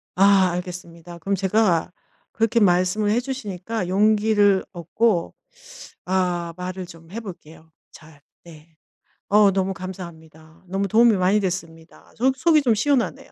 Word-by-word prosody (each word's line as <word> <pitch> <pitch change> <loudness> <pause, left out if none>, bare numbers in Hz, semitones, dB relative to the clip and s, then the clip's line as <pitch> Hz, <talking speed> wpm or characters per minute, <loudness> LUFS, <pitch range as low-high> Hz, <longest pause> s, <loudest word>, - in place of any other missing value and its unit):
아. 195 -1 +4
알겠습니다. 175 -1 -8
그럼 195 +4 -1
제가 190 -3 +1 0.4
그렇게 225 +2 +1
말씀을 185 +2 +2
해 235 - +2
주시니까 225 -6 -5
용기를 205 0 +3
얻고 175 +2 -1 0.7
아 175 -2 -1
말을 180 0 -6
좀 165 0 -15
해 230 +4 -6
볼게요 165 -5 -12 0.2
잘. 155 -2 -17 0.2
네. 160 -1 -16 0.5
어 205 -1 +5
너무 190 0 -1
감사합니다. 165 -3 -11
너무 195 +2 -2
도움이 225 +2 +4
많이 190 +3 +2
됐습니다. 170 -4 -6
속 260 +3 +1
속이 315 0 +3
좀 240 -5 +2
시원하네요. 240 -2 -1
185 Hz, 290 characters per minute, -22 LUFS, 170-210 Hz, 0.7 s, 어